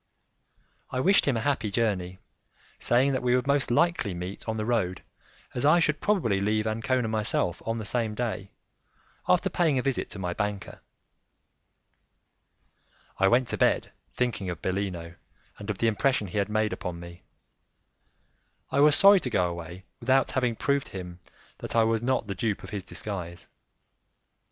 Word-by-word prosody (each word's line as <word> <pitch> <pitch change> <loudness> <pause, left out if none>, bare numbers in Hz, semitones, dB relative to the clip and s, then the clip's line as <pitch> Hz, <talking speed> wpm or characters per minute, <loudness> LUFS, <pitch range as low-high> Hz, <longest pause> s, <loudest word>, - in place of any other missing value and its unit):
I 130 - -3
wished 195 +6 +4
him 135 -4 +2
a - - -1
happy 130 -4 0
journey, 100 -5 -1 0.6
saying 130 +3 +3
that 130 - -1
we 125 0 +2
would 125 - 0
most 140 0 +1
likely 120 - +1
meet 90 +5 -6
on 110 - -2
the 110 - -2
road, 110 -7 -1 0.5
as 120 - -2
I 155 +4 +5
should 155 -2 +1
probably 120 - +1
leave 105 +1 +1
Ancona 115 +2 0
myself 105 -5 0
on 115 0 -1
the 110 - -5
same 110 -1 -1
day, 110 -4 -3 0.8
after - - +3
paying 160 -6 +1
a 125 - 0
visit 135 -3 -1
to - - -9
my 90 -2 -3
banker. 105 0 -4 2.4
I 95 - +5
went 120 +4 +3
to - - -3
bed - - +2 0.2
thinking 110 -6 -1
of 85 - -5
Bellino 90 -3 -3 0.4
and 105 0 -8
of 105 - -2
the 115 - 0
impression 110 +1 +1
he 105 - -2
had 100 - 0
made 110 0 0
upon 90 -3 -5
me; 85 0 -11 1.5
I 140 - +1
was 150 0 +6
sorry 200 0 +7
to 130 - -4
go 95 -6 +2
away 85 +2 -8
without 130 +2 +2
having 125 -3 0
proved 140 +3 0
to - - -16
him 90 -2 -7 0.4
that - - -6
I 115 - +5
was 115 0 +1
not 130 -1 0
the 100 - -4
dupe 105 +2 -2
of - - -9
his 100 -3 -4
disguise. 90 -2 -6
110 Hz, 170 wpm, -27 LUFS, 95-125 Hz, 2.4 s, sorry